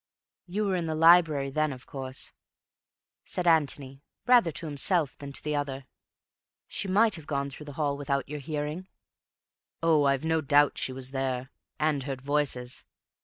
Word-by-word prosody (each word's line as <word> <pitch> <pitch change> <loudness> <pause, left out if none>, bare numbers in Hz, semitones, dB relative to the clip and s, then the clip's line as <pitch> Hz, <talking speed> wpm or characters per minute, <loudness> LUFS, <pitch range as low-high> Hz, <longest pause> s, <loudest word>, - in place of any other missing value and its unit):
"You 205 +4 -1
were 195 -2 +1
in 170 -2 -2
the 160 - -1
library 160 -4 +5
then, 155 +1 +1
of 130 -2 -9
course," 130 -1 -6 0.9
said 180 - -2
Antony, 140 -4 +1 0.2
rather 240 -9 +5
to 165 - -6
himself 155 0 +1
than 140 -1 -7
to - - -5
the 150 0 -1
other. 140 -2 -3 0.8
"She - - -3
might 215 +3 +4
have 160 -5 -3
gone 140 -1 -2
through 150 +2 -11
the 145 - -7
hall 145 -2 0
without 140 -1 -2
your 150 +1 -5
hearing." 150 +5 -4 1.0
"Oh, 155 -3 +4
I've 140 +1 +1
no 160 0 +2
doubt 145 0 +3
she - - -1
was 130 0 -5
there, 135 -1 -2 0.3
and 150 -2 +1
heard 135 -1 -4
voices. 135 -3 -1
145 Hz, 170 wpm, -28 LUFS, 135-160 Hz, 1.0 s, library